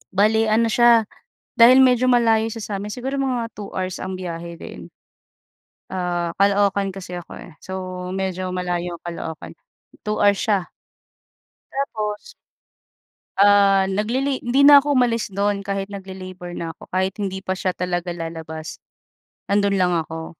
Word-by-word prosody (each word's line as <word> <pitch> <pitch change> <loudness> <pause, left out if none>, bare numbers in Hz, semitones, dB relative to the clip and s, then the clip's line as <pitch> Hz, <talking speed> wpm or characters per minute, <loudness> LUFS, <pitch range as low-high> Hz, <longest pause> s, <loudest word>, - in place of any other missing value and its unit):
Bale 220 +3 +3
ano 225 +1 +2
siya, 235 -1 +5 0.5
dahil 245 +3 +7
medyo 255 -1 +4
malayo 225 -2 +3
siya 225 - -6
sa 205 - -5
amin 205 +1 -6
siguro 260 +4 -4
mga 250 -4 -1
2 205 -1 -8
hours 185 0 -4
ang 190 0 -4
biyahe 170 -1 -6
din. - - -10 1.0
Ah, 175 -2 -2
Caloocan 200 0 +2
kasi 185 -1 -8
ako, 175 - -9
eh. 175 - -12
So, 185 -1 -6
medyo 185 -1 -3
malayo 180 -1 -3
Caloocaan, 160 - -6 0.5
2 210 0 -2
hours 205 -1 +4
siya. 200 -5 0 1.0
Tapos. 215 -6 -4 1.1
Ah, 200 -1 +5
naglili 245 +8 0
hindi 250 +3 +2
na 290 -1 +10
ako 290 0 +1
umalis 235 -4 +1
do'n 200 +1 -1
kahit 195 0 -2
nagli-labor 185 -2 -8
na 165 -1 -5
ako, - - -14
kahit 190 +1 0
hindi 195 -2 -3
pa 190 0 -2
siya 185 0 -1
talaga 175 0 -2
lalabas, 160 -1 -7 0.7
nandoon 200 0 +2
lang 180 -1 +2
ako. 160 -1 -4
195 Hz, 145 wpm, -21 LUFS, 180-220 Hz, 1.1 s, na